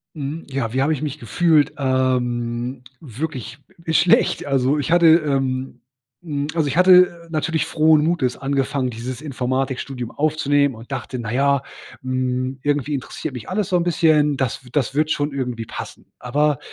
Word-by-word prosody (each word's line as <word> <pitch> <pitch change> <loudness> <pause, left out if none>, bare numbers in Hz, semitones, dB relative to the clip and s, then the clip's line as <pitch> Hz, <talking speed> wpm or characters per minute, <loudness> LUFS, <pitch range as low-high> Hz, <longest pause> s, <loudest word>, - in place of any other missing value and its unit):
Mhm, 150 +2 -5
ja, 130 -4 -3
wie 130 - +1
habe 145 +3 +2
ich 145 - -4
mich 150 -1 -4
gefühlt? 155 +5 +2
Ähm, 125 -2 -1 0.2
wirklich 130 -3 -6 0.3
schlecht. 160 +2 +3
Also, 135 +1 +1
ich 145 +3 -2
hatte, 170 -1 +5
ähm, 135 -5 +2 0.4
hm 145 -4 -3
also, 160 -3 +1
ich 140 - -2
hatte 180 -2 +5
natürlich 160 -1 0
frohen 155 -1 +3
Mutes 155 -7 0
angefangen, 135 -1 -1
dieses 120 +3 -6
Informatikstudium 130 -2 -3
aufzunehmen 145 -3 +1
und 115 +4 -13
dachte: 130 -1 -4
„Na 115 -3 -5
ja, 140 +2 +2 0.4
hm, 130 0 -2
irgendwie 145 0 0
interessiert 135 +1 -5
mich 120 -4 -8
alles 195 0 -1
so 180 - +3
'n 170 - +1
bisschen. 155 -4 +3
Das 130 -1 -2
w 125 - -14
das 135 -2 0
wird 155 +1 +2
schon 145 0 -1
irgendwie 125 -4 -3
passen.“ - - -8
Aber 145 +3 +1
140 Hz, 160 wpm, -21 LUFS, 130-155 Hz, 0.4 s, hatte